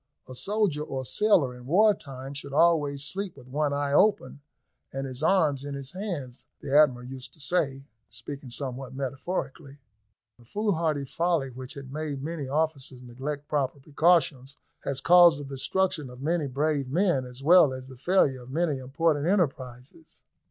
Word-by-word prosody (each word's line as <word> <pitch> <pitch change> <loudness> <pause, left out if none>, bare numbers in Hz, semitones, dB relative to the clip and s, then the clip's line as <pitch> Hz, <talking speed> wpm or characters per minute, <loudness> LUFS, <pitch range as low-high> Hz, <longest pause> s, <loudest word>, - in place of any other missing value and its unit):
A 130 - -9
soldier 200 - 0
or 135 -3 -4
sailor 135 - +2
in 125 0 -12
war 210 +7 +5
time 135 -4 -9
should 140 0 -7
always 145 -3 +3
sleep 190 +2 -4
with 125 -2 -14
one 145 +2 0
eye 140 0 -1
open, 190 -4 +2 0.5
and 135 0 -4
his 130 0 -7
arms 155 -6 +2
in 145 0 -5
his 135 -1 -6
hands, 170 - -6
the 140 - -3
Admiral 130 -5 +4
used 130 0 -9
to - - -22
say, 140 -4 0 0.2
speaking 125 +4 -8
somewhat 130 0 -6
metaphorically. 135 +1 -4 0.6
The 120 - -19
foolhardy 165 - -1
folly 165 -2 0
which 130 +1 -8
had 135 -1 -9
made 150 -3 -4
many 155 -3 -4
officers 140 -3 -2
neglect 140 +4 -6
proper 140 -2 -1
precautions, 140 -2 +1 0.2
has 135 -1 -3
caused 175 -2 +7
the 145 - -6
destruction 150 +3 -1
of 125 0 -12
many 155 +1 0
brave 140 0 -1
men, 170 -3 +2
as 125 +1 -11
well 165 -2 +7
as 130 0 -7
the 130 - -11
failure 135 -2 +2
of 120 - -13
many 155 -1 0
important 145 +3 0
enterprises. 140 - -2
140 Hz, 165 wpm, -27 LUFS, 130-165 Hz, 0.6 s, caused